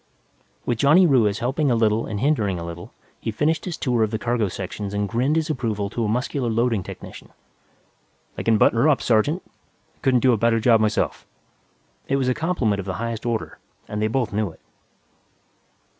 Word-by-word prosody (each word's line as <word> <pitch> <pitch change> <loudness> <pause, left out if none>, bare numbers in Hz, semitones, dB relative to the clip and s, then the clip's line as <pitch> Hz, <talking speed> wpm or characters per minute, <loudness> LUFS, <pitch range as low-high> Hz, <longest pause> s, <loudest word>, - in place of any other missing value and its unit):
With 120 -2 -1
Johnny 155 +8 +6
Ruiz 115 - +3
helping 135 +5 0
a 120 - +3
little 110 -1 +1
and 105 -2 -4
hindering 110 -8 +1
a 85 - -5
little, 85 0 -8 0.3
he - - -4
finished 150 +8 0
his 180 -3 -4
tour 120 -3 0
of 110 - +2
the 110 - -2
cargo 115 -1 0
sections 100 +2 -5
and 100 0 0
grinned 125 +8 0
his 160 -1 +1
approval 110 -7 -2
to 120 - -2
a - - 0
muscular 125 +3 -1
loading 115 -2 +1
technician. - - -10 1.1
"They - - -5
can 115 -1 +3
button 115 - +3
her 145 +6 +4
up, 145 - +2
sergeant. 135 - +2
I - - -39
couldn't 130 -2 +3
do 130 -2 +4
a - - +2
better 115 +1 +2
job 115 0 +4
myself." 110 0 -1 0.8
It 135 - +1
was 130 -2 +1
a - - +3
compliment 150 - 0
of 100 - -6
the 95 - -3
highest 115 0 -4
order, 115 -2 -3 0.3
and 105 0 -4
they 110 - +2
both 120 0 -1
knew 105 -1 0
it. 80 - -16
115 Hz, 200 wpm, -23 LUFS, 105-130 Hz, 1.1 s, Johnny